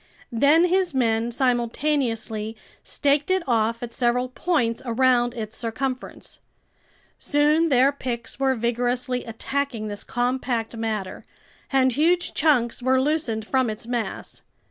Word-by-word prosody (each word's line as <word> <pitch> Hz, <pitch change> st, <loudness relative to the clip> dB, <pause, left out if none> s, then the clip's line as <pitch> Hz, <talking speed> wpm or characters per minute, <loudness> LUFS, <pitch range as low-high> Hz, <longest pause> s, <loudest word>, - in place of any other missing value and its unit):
Then 285 Hz, +8 st, +4 dB
his 360 Hz, -3 st, +1 dB
men 230 Hz, -2 st, +1 dB
simultaneously 240 Hz, -3 st, -1 dB, 0.3 s
staked 285 Hz, +2 st, 0 dB
it 375 Hz, -1 st, +2 dB
off 230 Hz, -1 st, +1 dB
at 235 Hz, -, -6 dB
several 250 Hz, +1 st, +1 dB
points 255 Hz, -5 st, 0 dB
around 245 Hz, 0 st, +2 dB
its 220 Hz, -2 st, -6 dB
circumference. 255 Hz, +2 st, -5 dB, 0.8 s
Soon 300 Hz, +3 st, +2 dB
their 265 Hz, 0 st, +4 dB
picks 250 Hz, -3 st, -5 dB
were 265 Hz, -1 st, +2 dB
vigorously 245 Hz, +2 st, -1 dB
attacking 230 Hz, 0 st, -3 dB
this 205 Hz, -1 st, -5 dB
compact 245 Hz, -2 st, -2 dB
matter, 215 Hz, -4 st, -4 dB, 0.5 s
and 260 Hz, -1 st, +3 dB
huge 345 Hz, +6 st, +2 dB
chunks 255 Hz, -6 st, +2 dB
were 260 Hz, +1 st, +3 dB
loosened 260 Hz, -6 st, -1 dB
from 260 Hz, 0 st, +1 dB
its 215 Hz, +1 st, -5 dB
mass. 240 Hz, -2 st, -4 dB
250 Hz, 120 wpm, -24 LUFS, 230-280 Hz, 0.8 s, Then